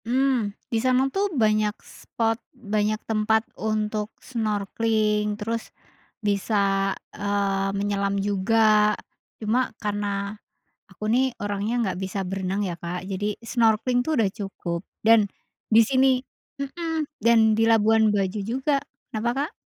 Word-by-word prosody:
Mmm, 255 -2 +2 0.2
di - - +3
sana 255 +1 +3
tuh 400 +1 +1
banyak 215 - +1
spot, 225 0 -2 0.3
banyak 215 0 +2
tempat 220 0 +1
untuk 215 -1 -2
snorkeling 210 -1 0
terus, 225 +2 -3 0.6
bisa, 205 +1 +1 0.6
eee, 200 -1 0
menyelam 200 0 0
juga, 210 +2 +3 0.4
cuma 230 +4 +1
karena, 205 -1 -3 0.4
aku 190 +1 -12
nih 255 +2 +2
orangnya 205 +2 -2
nggak 190 -5 -1
bisa 190 +1 -3
berenang 195 +1 -2
ya 180 -4 -2
Kak, 175 +1 -5
jadi 195 +1 -2 0.2
snorkeling 230 +1 +2
tuh 315 - 0
udah 205 - +2
cukup 185 -4 -4 0.2
dan, 220 -1 +6 0.5
di 225 - +8
sini 260 +2 +3 0.4
mhm, 320 +2 -3
dan 235 +1 +4 0.2
di 225 - +4
Labuan 220 -1 +4
Bajo 200 +2 -1 0.6
kenapa 220 +2 -1 0.2
Kak? - - -27
215 Hz, 120 wpm, -25 LUFS, 200-230 Hz, 0.6 s, di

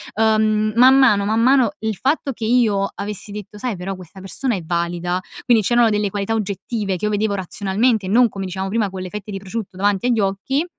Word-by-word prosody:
uhm, 215 0 +2
man 255 +3 +7
mano, 210 -7 +4
man 220 +2 +1
mano 255 -2 +4
il 220 -1 -2
fatto 275 - 0
che 225 -3 -5
io 220 -4 +2
avessi 205 0 -5
detto: 210 0 -8
"Sai 235 +1 -3
però 190 +2 -5
questa 185 0 -13
persona 235 +6 -2
è 185 - -4
valida." 175 +1 -2 0.2
Quindi 230 -3 +3
c'erano 240 +2 +3
delle 210 -1 0
qualità 200 +2 -2
oggettive 205 -1 -2
che 195 - -3
io 210 - 0
vedevo 210 0 0
razionalmente 200 +4 0
e - - -4
non 240 +3 +4
come 195 -1 -6
dicevamo 190 +1 -4
prima 210 0 0
con 190 0 -7
le 185 - -6
fette 210 +1 -7
di 195 - -4
prosciutto 195 0 -6
davanti 200 +3 +1
agli 240 -2 +2
occhi, 200 - -1
210 Hz, 215 wpm, -20 LUFS, 195-230 Hz, 0.2 s, man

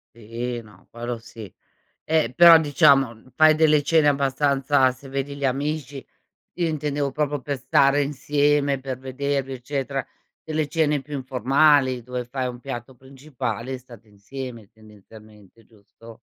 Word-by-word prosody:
Sì, 120 +2 -5
no, 105 -4 -19
quello 120 0 -6
,sì. 110 -4 -11 0.5
Eh, 155 -6 +1
però 170 -1 +9
diciamo, 135 -5 +3
fai 155 0 +6
delle 155 -2 +4
cene 155 0 +3
abbastanza 140 -1 +2
se 130 +2 -14
vedi 140 +1 -4
gli 140 -1 -3
amici, 140 +1 -3 0.5
io 175 -2 -1
intendevo 145 -2 -2
proprio 145 0 -2
per 140 -1 -4
stare 140 +2 +3
insieme, 145 0 0
per 130 -1 -5
vedervi 135 +1 -3
eccetera; 135 +1 -4 0.4
delle 155 -2 -2
cene 150 -4 0
più 145 0 -7
informali, 130 0 +2
dove 125 0 -5
fai 130 +1 -3
un 120 0 -8
piatto 130 -1 -7
principale 130 -2 -6
e - - -5
state 120 -3 -16
insieme 115 +1 -9
tendenzialmente, 110 0 -18
giusto? 110 +1 -18
135 Hz, 140 wpm, -23 LUFS, 120-145 Hz, 0.5 s, però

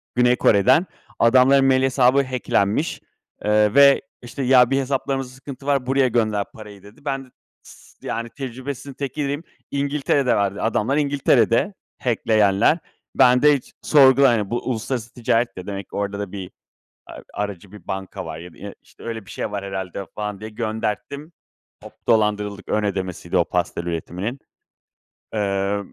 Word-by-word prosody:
Güney 125 0 +4
Kore'den. 125 - +4 0.3
Adamların 130 +3 +5
mail 130 -1 +3
hesabı 135 +1 +3
hack'lenmiş, 125 0 -1 0.4
eee, 105 0 +3
ve, 140 0 +7 0.2
işte, 125 +3 -6
"Ya, 125 -1 +5
bir 135 0 +2
hesaplarımızda 135 -1 -2
sıkıntı 135 0 -10
var, 140 -3 +1
buraya 135 0 +2
gönder 110 -4 0
parayı." 105 -3 -12
dedi. 105 +9 -17
Ben 135 -1 -2
de - - -21 0.3
s - - -15
yani, 115 +1 -3
tecrübesizin 130 +2 -7
tekiydim. 145 +2 -3 0.3
İngiltere'de 140 -1 +1
verdi, 100 -1 -1
adamlar 115 +4 0
İngiltere'de. 140 - +2 0.3
Hack'leyenler. 110 - +2 0.4
Ben 125 0 +5
de 150 0 +6
hiç 130 - -16
sorgula 135 -3 +6
yani. 105 -4 -1
Bu, 120 +2 -2
uluslararası 120 0 -3
ticaret 115 -3 0
de 90 - -8
demek, 100 -1 -6
orada 100 0 -3
da 100 -3 -5
bir 95 -2 -7 0.6
a - - -11 0.2
aracı 100 -2 -5
bir 105 - -13
banka 95 0 -5
var 80 - -7
ya 85 +1 -10
da - - -20
i - - -8
işte, - - -20
öyle 115 -3 -5
bir - - -12
şey - - -4
var 100 -1 -4
herhâlde 95 0 -5
falan 105 -2 -5
diye 110 +1 -7
gönderttim. 110 +7 -4 0.5
Hop, - - -11 0.2
dolandırıldık! 105 -2 +1
Ön 105 0 0
ödemesiydi 95 -3 -3
o - - +4
pastel - - -2
üretiminin. 90 - -4 1.0
Eee, 100 -1 0
115 Hz, 155 wpm, -22 LUFS, 100-135 Hz, 1.0 s, ve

